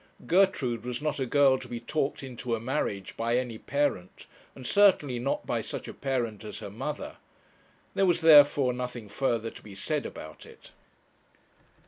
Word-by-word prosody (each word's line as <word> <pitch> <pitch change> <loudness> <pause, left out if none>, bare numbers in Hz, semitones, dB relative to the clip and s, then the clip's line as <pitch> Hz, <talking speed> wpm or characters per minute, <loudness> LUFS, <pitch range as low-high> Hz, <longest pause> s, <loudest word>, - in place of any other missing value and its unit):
Gertrude 165 - +2
was 125 0 -4
not 150 -1 -2
a 130 - -1
girl 135 0 +4
to - - -9
be 120 - -5
talked 140 +4 -2
into 125 -2 -3
a - - -5
marriage 110 -6 -3
by 115 +1 0
any 120 -3 -3
parent, 140 -11 -2 0.3
and 130 - -10
certainly 150 -9 +4
not 135 +3 -2
by - - -1
such - - -5
a - - -7
parent 120 -6 -2
as 105 - -7
her 100 - -7
mother. 135 +8 -5 0.8
There 195 - +2
was, 175 - +2
therefore, 145 -4 +7
nothing 125 -3 -5
further 115 -1 -1
to - - -13
be 105 -2 -12
said 150 +9 -2
about 80 0 -10
it. - - -16
125 Hz, 170 wpm, -28 LUFS, 115-145 Hz, 0.8 s, therefore